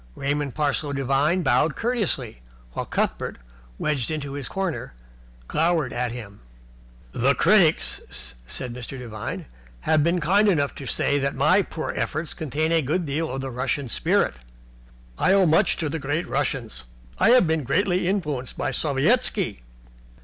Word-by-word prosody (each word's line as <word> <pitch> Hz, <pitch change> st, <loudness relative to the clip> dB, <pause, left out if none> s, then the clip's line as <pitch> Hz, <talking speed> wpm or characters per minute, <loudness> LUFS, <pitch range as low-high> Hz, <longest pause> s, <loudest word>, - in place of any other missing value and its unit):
Raymond 145 Hz, -1 st, -2 dB
Parsloe 145 Hz, -1 st, 0 dB
Devine 140 Hz, +6 st, +1 dB
bowed 155 Hz, -1 st, +2 dB
courteously, 200 Hz, -, -1 dB, 0.3 s
while -, -, -4 dB
Cuthbert, -, -, -1 dB, 0.4 s
wedged 145 Hz, -5 st, -1 dB
into 145 Hz, -3 st, -4 dB
his 140 Hz, -2 st, -4 dB
corner, 190 Hz, -, -3 dB, 0.5 s
glowered 160 Hz, -3 st, +1 dB
at 120 Hz, -1 st, -1 dB
him. 110 Hz, -5 st, -8 dB, 0.7 s
"The 135 Hz, -, +2 dB
critics," 155 Hz, -, +2 dB
said 125 Hz, -, -5 dB
Mr. 125 Hz, +2 st, -7 dB
Devine, 115 Hz, -4 st, -6 dB, 0.4 s
"have 155 Hz, -2 st, +3 dB
been 170 Hz, +3 st, +2 dB
kind 195 Hz, +7 st, +3 dB
enough 145 Hz, -8 st, +2 dB
to 135 Hz, -, -7 dB
say 140 Hz, +3 st, +1 dB
that 140 Hz, 0 st, -1 dB
my 155 Hz, +9 st, +4 dB
poor 165 Hz, -3 st, -4 dB
efforts 155 Hz, +2 st, -2 dB
contain 155 Hz, +1 st, -1 dB
a 165 Hz, -1 st, +4 dB
good 160 Hz, +6 st, -1 dB
deal 155 Hz, +3 st, -2 dB
of 130 Hz, +1 st, -3 dB
the 135 Hz, -1 st, -4 dB
Russian 130 Hz, +2 st, -2 dB
spirit. -, -, +2 dB, 0.9 s
I 190 Hz, -, +4 dB
owe 195 Hz, -1 st, +5 dB
much 160 Hz, 0 st, +3 dB
to 160 Hz, -, -1 dB
the 160 Hz, +2 st, -3 dB
great 150 Hz, +4 st, -2 dB
Russians. 115 Hz, -, -2 dB, 0.3 s
I -, -, +5 dB
have 250 Hz, -4 st, +6 dB
been 160 Hz, -2 st, 0 dB
greatly 180 Hz, +6 st, +1 dB
influenced 150 Hz, -10 st, -2 dB
by -, -, -1 dB
Sovietski." 155 Hz, -, +1 dB
150 Hz, 150 wpm, -24 LUFS, 135-170 Hz, 0.9 s, have